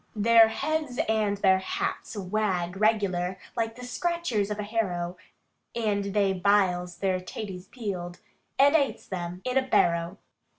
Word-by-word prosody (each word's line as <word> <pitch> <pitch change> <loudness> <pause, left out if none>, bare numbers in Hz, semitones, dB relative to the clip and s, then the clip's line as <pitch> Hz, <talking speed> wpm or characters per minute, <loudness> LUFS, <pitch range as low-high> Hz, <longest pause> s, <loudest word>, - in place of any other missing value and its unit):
Their 225 +1 +6
heads 300 +2 -2
and 215 -2 +1
their 190 -1 +4
hats 190 - -3
wags 190 -3 -1
regular, 195 -4 +1 0.2
like 225 -1 -1
the 250 - -9
scratchers 255 - -1
of 210 - -3
a 210 - -3
harrow, 185 -5 -2 0.6
And 210 -3 0
they 200 -1 +1
biles 180 -2 +1
their 190 -2 0
taties 185 0 -7
peeled, 185 -7 -5 0.4
and 285 +3 +5
ates 280 -4 +1
them 180 -1 -5
in 255 +1 +2
a - - +1
barrow. 170 -8 +1
205 Hz, 140 wpm, -27 LUFS, 185-225 Hz, 0.6 s, Their